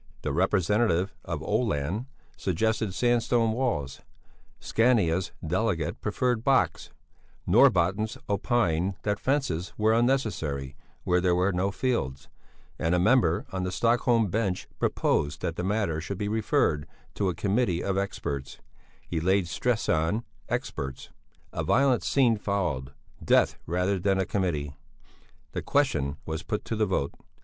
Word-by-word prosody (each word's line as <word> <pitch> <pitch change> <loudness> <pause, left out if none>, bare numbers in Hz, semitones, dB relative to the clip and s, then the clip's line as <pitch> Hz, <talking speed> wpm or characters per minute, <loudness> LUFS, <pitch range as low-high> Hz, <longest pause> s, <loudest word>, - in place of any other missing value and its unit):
The 75 - -1
representative 95 +1 +2
for 80 - -3
Oeland 105 - -1 0.3
suggested 110 +3 0
sandstone 120 0 +2
walls; 110 - -2 0.6
Scania's 100 -7 +2
delegate 90 -1 -1
preferred 125 -3 0
box; 135 0 +2 0.6
Norbotten's 95 +5 +3
opined 100 -4 +1
that 105 -1 -1
fences 130 - -1
were 110 +1 +3
unnecessary 85 - 0 0.3
where 90 0 +2
there 90 -1 +3
were 90 +2 +2
no 95 +2 0
fields, 95 - -2 0.5
and 80 +2 +1
a - - +2
member 95 -4 +3
on 95 - -3
the 90 0 -2
Stockholm 115 +1 +2
bench 100 -4 -1
proposed 75 0 0
that 85 - -2
the 90 - -3
matter 95 -5 0
should 95 +3 -5
be 105 - -2
referred 105 -8 +1 0.3
to 100 -2 0
a 90 - -3
Committee 100 -1 0
of 95 - -1
experts: 70 -8 -3 0.5
he 85 - -2
laid 95 +2 +2
stress 110 +8 -1
on 80 +9 +1 0.3
"experts." 65 -1 -4 0.4
A - - -2
violent 135 -3 +3
scene 125 -5 +3
followed. 90 -11 -2 0.3
Death - - +3
rather 90 +3 0
than 95 +1 +1
a 95 - +1
committee! 75 -8 -2 0.8
The - - -3
question 75 - +1
was 80 0 -3
put 105 -2 -4
to 115 - -2
the 110 -1 +1
vote. 80 -7 -1
95 Hz, 135 wpm, -27 LUFS, 85-110 Hz, 0.8 s, Norbotten's